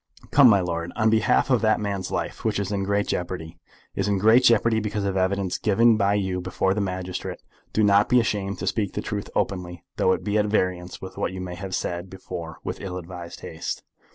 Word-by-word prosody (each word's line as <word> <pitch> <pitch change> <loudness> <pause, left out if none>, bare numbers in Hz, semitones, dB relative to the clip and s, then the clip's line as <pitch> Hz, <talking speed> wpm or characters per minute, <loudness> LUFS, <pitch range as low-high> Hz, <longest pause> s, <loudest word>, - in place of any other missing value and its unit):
Come, 140 -3 +8
my 100 -3 +5
lord, 85 -1 -3
on 110 -1 +3
behalf 110 +4 +3
of 125 - +4
that 110 -1 +3
man's 100 -3 -3
life, - - -3
which 110 -2 0
is 100 0 -2
in 100 -1 -1
great 100 +1 +1
jeopardy, 85 -2 -4 0.3
is 100 - -1
in 100 -1 +2
great 110 +6 +6
jeopardy 115 -1 +4
because 105 -1 -2
of 100 - 0
the 95 - 0
evidence 95 0 0
given 115 +2 +4
by 100 -1 +2
you 95 -2 -1
before 95 +1 0
the 105 - -1
magistrate, 90 -1 -4 0.3
do 110 - +2
not 100 0 +4
be 125 - +5
ashamed 100 -4 -1
to 95 - -4
speak 100 0 -1
the - - -3
truth 105 -1 -4
openly, 90 -3 -2
though 95 - +3
it - - -3
be 105 0 +1
at 105 - +1
variance 95 -4 -1
with 95 - -8
what - - -2
you 95 - -6
may 90 -1 -5
have 95 +1 -4
said 85 +1 -3
before 90 -3 -7
with - - -5
ill 90 -2 -5
advised 90 -1 -8
haste." - - -5
100 Hz, 225 wpm, -24 LUFS, 90-105 Hz, 0.3 s, Come